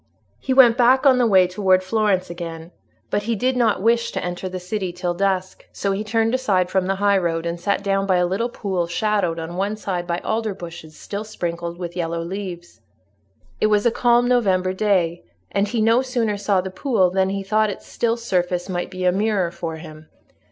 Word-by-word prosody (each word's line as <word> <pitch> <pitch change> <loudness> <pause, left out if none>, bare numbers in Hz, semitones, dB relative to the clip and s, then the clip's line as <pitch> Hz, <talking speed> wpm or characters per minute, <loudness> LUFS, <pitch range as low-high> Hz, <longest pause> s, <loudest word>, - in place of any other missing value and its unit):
He 265 - -4
went 250 -3 +6
back 255 +2 +4
on 260 -2 +6
the 245 - +4
way 190 -4 +5
towards 185 0 +2
Florence 195 -3 +1
again, 165 -1 -7 0.4
but 205 - +1
he 230 - +2
did 255 +4 0
not 225 -5 +1
wish 235 +1 +2
to - - -3
enter 180 +1 -4
the 185 0 -5
city 185 0 -3
till 175 0 -2
dusk; 190 0 -2
so 200 - -2
he 195 +2 -2
turned 225 +2 0
aside 195 -9 +1
from 190 -1 +1
the 195 - +1
highroad, 190 -5 +1
and 170 0 -3
sat 200 +2 -1
down 195 0 0
by 190 - +3
a 180 0 +3
little 200 +7 -1
pool 190 -7 -2
shadowed 190 -2 0
on 165 +2 -6
one 200 +3 -1
side 180 -4 -4
by 170 -1 -1
alder 220 -2 -1
bushes 165 -3 -10
still 200 +1 -5
sprinkled 170 -5 -5
with 175 -1 -6
yellow 170 -1 -2
leaves. 175 - -7 0.8
It - - +3
was 210 0 +2
a 235 - +4
calm 240 +1 +3
November 190 -7 +2
day, 185 -4 0 0.3
and 200 +1 +1
he 225 +2 -1
no 230 +3 +4
sooner 240 -5 -1
saw 200 -2 +1
the 190 +1 -6
pool 195 -6 +1
than 190 0 +1
he 195 0 -3
thought 215 +2 +1
its 200 - -7
still 235 0 -1
surface 180 -6 -1
might 175 -2 -3
be 185 -1 -4
a 180 - +5
mirror 195 -2 0
for 165 -2 -5
him. 155 -1 -11
190 Hz, 210 wpm, -21 LUFS, 175-215 Hz, 0.8 s, went